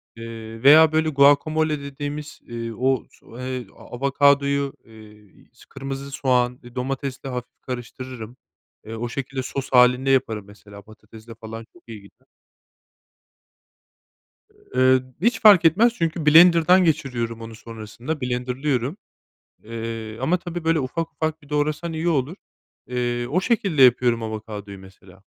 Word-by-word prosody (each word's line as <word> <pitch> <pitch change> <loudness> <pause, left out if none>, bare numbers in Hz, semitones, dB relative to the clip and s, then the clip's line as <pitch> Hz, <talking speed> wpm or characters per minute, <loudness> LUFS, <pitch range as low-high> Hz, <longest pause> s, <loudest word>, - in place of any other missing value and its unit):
Eee, 115 0 -9
veya, 155 +3 +8
böyle, 160 0 +1
guacamole 150 +2 +3
dediğimiz, 145 +2 -7
iii, 115 -1 -6
o 130 +1 0
so 115 - -15
eee, 130 -2 -5
avokadoyu, 140 +1 +1
eee 105 -2 -18
s - - -19
kırmızı 135 0 -7
soğan, 125 -2 0
eee, 120 0 -14
domatesle 135 +1 -4
hafif 125 -1 -7
karıştırırım. 125 -1 -8 0.5
Eee, 110 - -7
o 120 +1 -4
şekilde 130 +1 -4
sos 135 +1 -5
hâlinde 125 +1 +4
yaparım, 110 -6 +1
mesela, 100 0 -14
patatesle 110 +2 -15
falan 115 0 -9
çok 175 - -21
iyi 110 -3 -9
gider. 100 - -21 2.5
Eee, 130 0 +4 0.2
hiç 225 +4 +1
fark 205 -5 +8
etmez 215 +9 +4
çünkü 165 -4 -2
blenderdan 170 +3 +6
geçiriyorum 125 -7 -1
onu 115 0 -9
sonrasında, 115 +7 -7
blenderlıyorum. 125 - -2 0.7
Eee, 115 -1 -6
ama 160 +8 +2
tabii, 175 -1 -7
böyle, 165 -1 +2
ufak 160 +5 -4
ufak 160 0 -3
bir 145 - -18
doğrasan 150 +3 -1
iyi 160 +2 -2
olur. 150 +3 0 0.5
Eee, 120 -1 -2
o 170 +9 0
şekilde 195 - +1
yapıyorum 120 -2 +4
avokadoyu 105 -2 -7
mesela. 95 0 -17
130 Hz, 130 wpm, -22 LUFS, 115-150 Hz, 2.5 s, veya